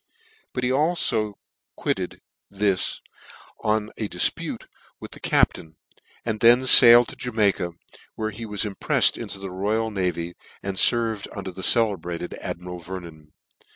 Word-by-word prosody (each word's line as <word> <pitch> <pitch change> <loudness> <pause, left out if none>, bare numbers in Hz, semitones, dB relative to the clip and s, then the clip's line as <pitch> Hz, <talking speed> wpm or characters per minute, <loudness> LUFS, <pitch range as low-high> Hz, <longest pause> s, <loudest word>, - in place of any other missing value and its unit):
This 125 - -2
he 125 - +1
alfo 135 -8 0 0.4
quitted, - - -3 1.4
on 110 0 -1
a 105 - -3
difpute 90 - -1 0.3
with - - -10
the - - -10
captain, 80 -1 +1 0.5
and 110 -2 -2
then 120 +3 +5
failed 120 -1 +8
to - - -10
Jamaica, 100 -7 0 0.4
where 110 0 -3
he 115 +2 -8
was 105 -1 -2
impreifed 105 -3 +2
into - - -6
ehe 95 0 -7
royal 110 +4 -1
navy, 90 -3 -2 0.3
and 95 -1 -4
ferved 115 -3 +2
under 95 -1 -5
the 95 - -9
celebrated 90 -6 +1
admiral 90 0 -6
Vernon. 85 -4 -10
105 Hz, 130 wpm, -23 LUFS, 90-115 Hz, 1.4 s, failed